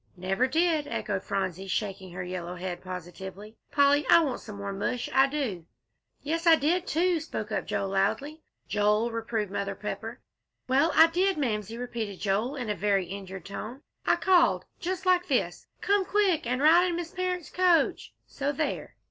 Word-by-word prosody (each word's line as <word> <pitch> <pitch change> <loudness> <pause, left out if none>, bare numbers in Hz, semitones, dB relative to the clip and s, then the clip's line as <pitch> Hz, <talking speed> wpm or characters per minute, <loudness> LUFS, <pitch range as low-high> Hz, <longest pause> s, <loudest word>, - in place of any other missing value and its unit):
"Never 195 +8 +1
did!" 315 +1 +1
echoed 195 -8 -3
Phronsie, 190 -1 -3
shaking 190 -1 -3
her 180 0 -4
yellow 180 -1 -5
head 180 0 -5
positively. 190 +3 -8 0.2
"Polly, 285 0 +4
I 335 - +8
want 270 -5 -2
some 210 - -9
more 200 0 -5
mush, 210 +5 -2
I 270 +1 +5
do." 245 - -3 0.6
"Yes, 330 +3 -2
I 330 - +9
did, 340 +5 0
too," 345 +1 +2
spoke 220 -9 -5
up 210 - -2
Joel, 195 - -1
loudly. 220 +11 -1 0.3
"Joel!" 210 +3 +2
reproved 225 -3 -2
Mother 200 0 -3
Pepper. - - -6 0.5
"Well, 275 +6 +3
I 320 - +9
did, 365 +3 +1
Mamsie," 225 -5 -2
repeated 230 -5 -5
Joel, 215 +7 0
in 250 -4 -4
a 210 - -1
very 200 -2 +1
injured 190 -1 -8
tone. 225 +6 -7 0.2
"I - - +3
called 360 -3 +3
just 370 +1 -3
like 365 -1 +3
this, - - -1
'come 405 -2 +2
quick! 375 - +1
and 250 +3 0
ride 340 +4 +6
in 350 - -1
Miss 340 -1 -4
Parrott's 365 -2 -3
coach;' 360 -2 +2
so 280 +1 -2
there!" 300 +2 -3
245 Hz, 175 wpm, -28 LUFS, 195-325 Hz, 0.6 s, I